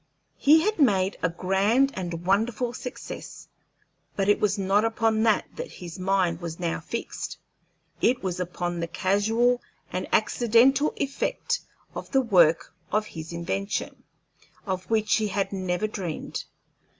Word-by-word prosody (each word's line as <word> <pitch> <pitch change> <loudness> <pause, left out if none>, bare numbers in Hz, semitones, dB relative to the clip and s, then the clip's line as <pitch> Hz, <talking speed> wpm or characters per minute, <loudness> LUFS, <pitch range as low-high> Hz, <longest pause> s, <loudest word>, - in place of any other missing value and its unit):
He 310 +3 +6
had 430 0 0
made 195 -8 +3
a 180 - +2
grand 200 +10 +2
and 175 -2 -5
wonderful 225 +5 +1
success, 250 0 -8 0.7
but 195 -1 0
it 205 - +4
was 205 -1 +1
not 195 +2 +2
upon 225 -1 +1
that 220 -1 +3
that - - -6
his 175 0 -9
mind 185 -3 +1
was 165 -1 -6
now 170 -2 -1
fixed. 230 +8 -5 0.6
It 245 -2 +2
was 185 -2 -2
upon 175 -1 -3
the 170 - -2
casual 225 +8 +2 0.3
and - - -2
accidental 245 +5 +4
effect 475 - -1 0.3
of - - -7
the 270 - +3
work 175 -11 +3 0.2
of 210 0 +1
his 160 0 -7
invention, 195 +4 -3 0.6
of 185 -2 -3
which 215 -2 +2
he 215 -1 0
had 200 0 -1
never 185 +1 -1
dreamed. 190 -7 -4
200 Hz, 140 wpm, -26 LUFS, 180-230 Hz, 0.7 s, He